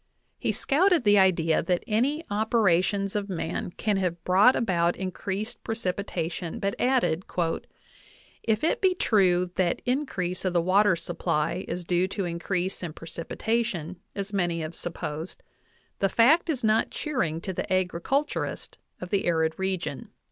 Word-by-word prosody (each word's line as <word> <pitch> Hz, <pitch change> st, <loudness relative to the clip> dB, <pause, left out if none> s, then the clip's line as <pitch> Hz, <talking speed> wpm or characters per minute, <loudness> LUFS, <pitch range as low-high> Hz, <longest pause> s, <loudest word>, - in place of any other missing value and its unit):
He -, -, 0 dB
scouted 340 Hz, +1 st, +2 dB
the 205 Hz, -1 st, +5 dB
idea 170 Hz, -4 st, +3 dB
that 175 Hz, +1 st, 0 dB
any 275 Hz, +9 st, 0 dB
operations 200 Hz, -2 st, +2 dB
of 205 Hz, -1 st, -2 dB
man 170 Hz, -2 st, -3 dB
can 210 Hz, -2 st, +1 dB
have 175 Hz, -3 st, -2 dB
brought 195 Hz, +8 st, +5 dB
about 175 Hz, -6 st, +1 dB
increased 200 Hz, +4 st, -4 dB
precipi 200 Hz, -4 st, -2 dB
tation, 170 Hz, -2 st, -4 dB
but 200 Hz, 0 st, -1 dB
added, 245 Hz, -9 st, +2 dB, 1.2 s
"if 220 Hz, +1 st, 0 dB
it 325 Hz, -, +1 dB
be 375 Hz, -2 st, +3 dB
true 180 Hz, -, +3 dB
that 175 Hz, -2 st, +1 dB
increase 245 Hz, -9 st, -1 dB
of 185 Hz, -2 st, 0 dB
the 175 Hz, -, +4 dB
water 185 Hz, +2 st, +4 dB
sup 170 Hz, 0 st, -6 dB
ply 170 Hz, +5 st, 0 dB
is 180 Hz, -1 st, -4 dB
due 175 Hz, +1 st, +2 dB
to 195 Hz, 0 st, -3 dB
increase 175 Hz, +2 st, -2 dB
in 170 Hz, -4 st, -5 dB
precipitation, 180 Hz, +1 st, -3 dB, 0.2 s
as 200 Hz, 0 st, -4 dB
many 175 Hz, -4 st, 0 dB
have 155 Hz, +1 st, -5 dB
supposed, 165 Hz, -1 st, -5 dB, 0.6 s
the 195 Hz, -, +2 dB
fact 300 Hz, -, +4 dB
is 270 Hz, -6 st, -1 dB
not 220 Hz, 0 st, +3 dB
cheering 180 Hz, -, -2 dB
to 190 Hz, +3 st, -4 dB
the 180 Hz, -, -4 dB
agriculturist 185 Hz, -, -1 dB, 0.2 s
of 180 Hz, -, -7 dB
the 200 Hz, -2 st, +1 dB
arid 160 Hz, -2 st, +2 dB
re 190 Hz, 0 st, 0 dB
gion. 155 Hz, -5 st, -6 dB
190 Hz, 155 wpm, -27 LUFS, 175-220 Hz, 1.2 s, the